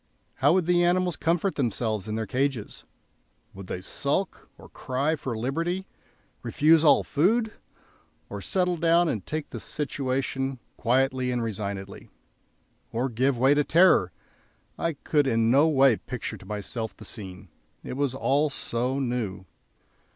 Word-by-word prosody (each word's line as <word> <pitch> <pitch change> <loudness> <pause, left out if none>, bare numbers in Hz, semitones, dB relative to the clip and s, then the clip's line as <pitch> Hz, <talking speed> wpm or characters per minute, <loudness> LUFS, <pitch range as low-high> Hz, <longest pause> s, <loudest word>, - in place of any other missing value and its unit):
How 145 +4 +4
would 185 -2 +2
the 175 0 +3
animals 180 0 +2
comport 170 +3 0
themselves 110 -5 -1
in 110 - -3
their 110 0 -2
cages? 130 -3 -2 0.7
Would 95 -1 -10
they 90 - -4
sulk - - -3
or - - -14
cry 140 +5 -1
for 130 -6 -5
liberty, 165 +10 -2 0.6
refuse 155 +7 +4
all 150 - +5
food? 220 +9 +1 0.7
or - - -7
settle 180 -2 0
down 170 +1 +3
and 110 -10 -2
take 155 -1 -5
the - - -5
situation 135 -2 -2 0.2
quietly 130 +1 +1
and 125 -1 -1
resignedly, 100 -3 -5 0.8
or 125 +4 -1
give 130 +3 +1
way 135 +4 +4
to 145 0 +2
terror? 165 - +4 0.6
I 165 - -1
could 145 0 0
in 115 -2 +2
no 140 +5 +5
way 135 -6 +4
picture 120 -3 -6
to 95 - -15
myself 105 +2 -5
the - - -11
scene; 95 -5 -9 0.3
it - - -6
was 135 -1 -1
all 145 +3 +2
so 125 -1 -2
new. 120 -8 -3
135 Hz, 145 wpm, -26 LUFS, 115-155 Hz, 0.8 s, all